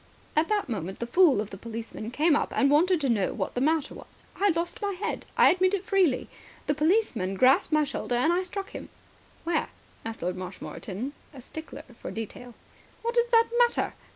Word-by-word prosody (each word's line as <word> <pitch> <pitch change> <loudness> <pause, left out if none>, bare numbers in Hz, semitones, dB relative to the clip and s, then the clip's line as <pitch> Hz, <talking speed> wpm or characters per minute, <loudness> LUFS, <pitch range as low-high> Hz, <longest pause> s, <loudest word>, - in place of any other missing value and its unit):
"At 310 +2 +3
that 420 -1 +1
moment 190 -6 -4
the 235 - -3
fool 285 - +4
of 210 -1 -7
a - - -6
policeman 225 0 -7
came 300 +5 +3
up - - 0
and 275 0 +3
wanted 345 +4 +4
to 280 - +1
know 210 -5 +1
what - - -3
the 245 - -2
matter 310 +1 +1
was. - - -14
I 405 +1 +2
lost 340 +3 -2
my 405 -1 -1
head. 370 - -4
I - - +7
admit 370 +2 +2
it 390 -1 -5
freely. 370 -10 +2 0.4
The 290 - +1
policeman 300 - +1
grasped 260 +9 +4
my 305 0 +4
shoulder, 265 -3 -3
and 255 +8 +3
I 360 - +2
struck 390 +1 -6
him." - - -8 0.5
"Where?" 335 -1 0 0.3
asked 225 -3 -6
Lord 180 +1 -1
Marshmoreton, 190 +6 -6 0.2
a - - -9
stickler 315 +5 -9 0.2
for - - -5
detail. 225 +2 -7 0.5
"What 470 +1 -1
does 480 0 +3
that 460 -1 +5
matter?" 480 -1 +2
300 Hz, 200 wpm, -27 LUFS, 230-370 Hz, 0.5 s, I